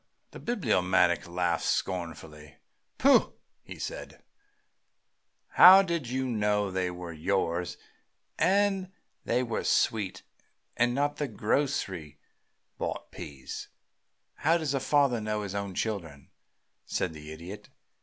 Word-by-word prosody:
The - - -10
Bibliomaniac 95 - +1
laughed 85 -1 0
scornfully. 75 -4 -3 0.4
"Pooh!" 275 +1 +4 0.4
said - - -6
he. - - -20 1.3
"How 190 +2 +9
did 170 -9 -2
you 130 +1 -1
know 105 -3 0
that 95 - -2
they 90 -1 0
were 90 -1 -7
yours 85 +1 -1 0.6
that 200 0 +3 0.5
were 120 -1 0
sweet, 105 -5 +1 0.5
and 120 +1 +2
not 145 +1 0
the 145 - -1
grocery 105 - -1 0.6
bought - - -4
peas?" 70 -2 -8 0.7
"How 165 +3 +3
does 155 -4 -2
a 135 - +1
father 135 -4 +2
know 105 0 -2
his 100 -1 -5
own 100 -2 -4
children?" 85 -11 -4 0.5
said 85 - -2
the 75 0 -10
Idiot. 85 +6 -9
105 Hz, 115 wpm, -29 LUFS, 85-135 Hz, 1.3 s, How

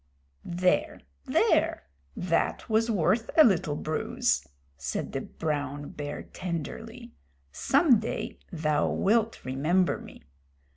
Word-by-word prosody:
"There 180 +1 0 0.3
there! - - +2 0.3
That 175 -2 0
was 225 0 +2
worth 220 +3 +1
a 315 - +10
little 170 - +2
bruise," 155 +1 0 0.3
said 70 0 -4
the - - -3
brown 145 -2 -3
bear 145 0 -5
tenderly. 225 - -6 0.4
"Some 275 - +4
day 220 - -4
thou 155 -3 +1
wilt 225 +2 +1
remember 155 +8 +1
me." - - -13
175 Hz, 105 wpm, -28 LUFS, 150-225 Hz, 0.4 s, a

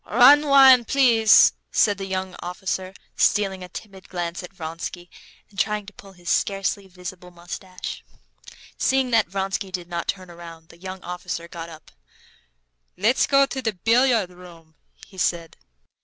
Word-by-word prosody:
"Rhine 280 +6 +6
wine, 265 -3 +7
please," 235 -5 +5 0.2
said 205 -1 +2
the 195 - -5
young 190 -1 -4
officer, 185 +1 -4 0.2
stealing 195 -3 +1
a 180 - -9
timid 195 0 -11
glance 175 -1 -4
at 180 - -10
Vronsky, 175 0 -7 0.4
and 200 - -9
trying 210 +1 0
to 205 - -12
pull 195 0 -15
his 175 -1 -17
scarcely 195 +2 -1
visible 180 0 -10
mustache. 180 +1 -8 0.8
Seeing 265 -1 +1
that 225 -2 +3
Vronsky 195 +1 -3
did 180 -2 -6
not 170 -1 -4
turn 185 -2 -4
round, 165 -1 -12
the 170 - -17
young 190 +1 -8
officer 175 -1 -6
got 170 -1 -8
up. 160 -1 -14 1.1
"Let's 220 +7 +2
go 275 0 +5
into 270 -1 -3
the 220 -3 -1
billiard 225 0 +2
room," 170 -3 -15 0.3
he 190 - -13
said. 170 -2 -1
190 Hz, 155 wpm, -23 LUFS, 175-215 Hz, 1.1 s, wine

